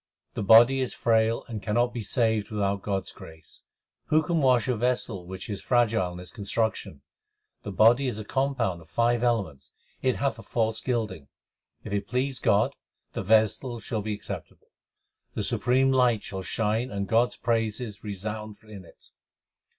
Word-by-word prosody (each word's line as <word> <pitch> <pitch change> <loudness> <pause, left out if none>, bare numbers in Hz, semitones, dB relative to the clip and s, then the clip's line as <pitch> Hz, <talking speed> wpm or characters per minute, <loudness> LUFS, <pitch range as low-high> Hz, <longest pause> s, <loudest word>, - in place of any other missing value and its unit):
The - - -4
body 115 +6 +7
is 130 - -2
frail 115 0 +2
and 110 -4 -5
cannot 120 +4 +1
be 120 - -4
saved 110 -1 0
without 100 -2 -1
God 95 -1 -2
s - - -10
grace: 80 -2 -14 0.4
Who 155 +1 +3
can 170 +1 0
wash 125 -6 +3
a 125 - +1
vessel 115 -6 -1
which 95 +1 -7
is 100 -4 -5
fragile 115 -7 +2
in 90 - -8
its 90 0 -9
construction? 105 - -2 0.6
The 100 - -6
body 115 +7 +4
is 120 - -2
a 110 - -6
compound 125 -9 -1
of 80 - -18
five 120 +5 +1
elements; 95 - -1 0.3
it 130 -1 +1
hath 135 -5 -1
a - - -7
false 110 0 -1
gilding. 110 - -2 0.6
If 105 - -6
it 100 -1 -2
please 130 +2 -1
God, 110 +7 +2 0.4
the - - -3
vessel 110 +4 +2
shall 110 -1 -3
be 105 0 -3
acceptable; - - -9 0.7
The - - -1
supreme 130 +2 +2
light 125 -5 +3
shall 95 -1 -5
shine 110 +5 -1
and 100 -2 -3
God 115 +3 +4
s - - -12
praises 115 -2 -2
resound 105 +1 -5
in 105 -3 -11
it. - - -18
110 Hz, 175 wpm, -27 LUFS, 100-120 Hz, 0.7 s, body